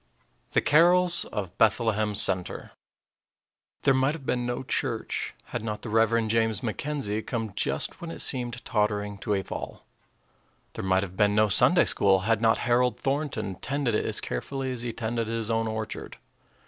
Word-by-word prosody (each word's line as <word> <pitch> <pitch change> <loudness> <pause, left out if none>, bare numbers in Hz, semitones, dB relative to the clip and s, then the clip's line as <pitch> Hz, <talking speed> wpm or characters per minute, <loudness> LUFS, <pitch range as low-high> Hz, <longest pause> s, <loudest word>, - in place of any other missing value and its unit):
_ - - -31
THE - - +4
CAROLS 175 +3 +4
OF 95 -4 -5
BETHLEHEM 110 -1 +2
CENTER 95 -3 0 1.1
There 135 - +5
might 135 +3 +2
have 145 -5 -10
been 125 -1 -1
no 120 +1 -3
church - - -2 0.2
had - - -2
not 105 -1 -4
the 115 - -5
Rev. 115 0 +3
James 110 0 +1
McKenzie 120 -2 -2
come 115 -5 -4
just - - -2
when 170 - -6
it - - -6
seemed 125 -3 -2
tottering 105 -2 -1
to 105 - -1
a 95 - -1
fall. - - -7 0.9
There - - -5
might 95 0 +2
have 95 -2 -7
been 105 +1 +3
no 110 0 +4
Sunday - - +4
school 95 -1 +3
had 110 +2 +1
not 115 -1 +4
Harold 125 +1 +2
Thornton 135 -7 -2
tended 140 -1 -1
it 105 - +1
as - - 0
carefully 130 - -3
as 125 -2 -4
he 120 -1 -3
tended 115 0 -2
his 115 0 -2
own 115 0 +1
orchard. 110 0 -5
115 Hz, 175 wpm, -27 LUFS, 105-125 Hz, 1.1 s, There